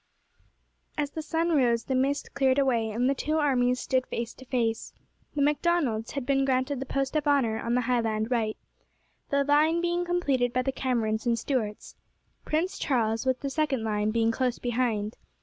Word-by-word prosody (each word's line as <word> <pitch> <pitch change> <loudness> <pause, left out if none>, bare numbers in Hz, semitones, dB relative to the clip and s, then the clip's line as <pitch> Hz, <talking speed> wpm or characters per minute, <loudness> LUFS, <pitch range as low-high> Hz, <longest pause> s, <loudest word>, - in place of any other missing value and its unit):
As 290 -1 -1
the 320 - -4
sun 325 +2 -1
rose 240 -6 +3
the 265 - -3
mist 270 +2 0
cleared 265 -1 +2
away, 240 -5 +2
and 235 +4 0
the 275 - +3
two 305 +3 -1
armies 250 -4 +2
stood 260 0 0
face 235 0 -4
to 260 - -14
face. 235 -3 -1 0.4
The 285 - +2
Macdonalds 290 -7 +1
had 275 -3 -3
been 270 +1 +2
granted 260 +1 0
the 270 - -5
post 275 +2 -2
of 300 -1 0
honour 245 -6 +2
on 235 +1 -1
the 250 - +2
Highland 230 -2 0
right, 220 -3 0 0.7
the 280 0 +2
line 300 +4 +3
being 345 0 0
completed 280 -9 0
by 255 - +1
the 270 - 0
Camerons 230 -4 -1
and 235 -1 +2
Stuarts, 225 -4 -3 0.5
Prince 330 +5 -1
Charles 230 -3 0
with 260 -1 +1
the 275 - -2
second 275 -5 0
line 210 -1 0
being 225 +1 +2
close 250 +1 0
behind. 230 -3 -1
255 Hz, 185 wpm, -27 LUFS, 230-285 Hz, 0.7 s, rose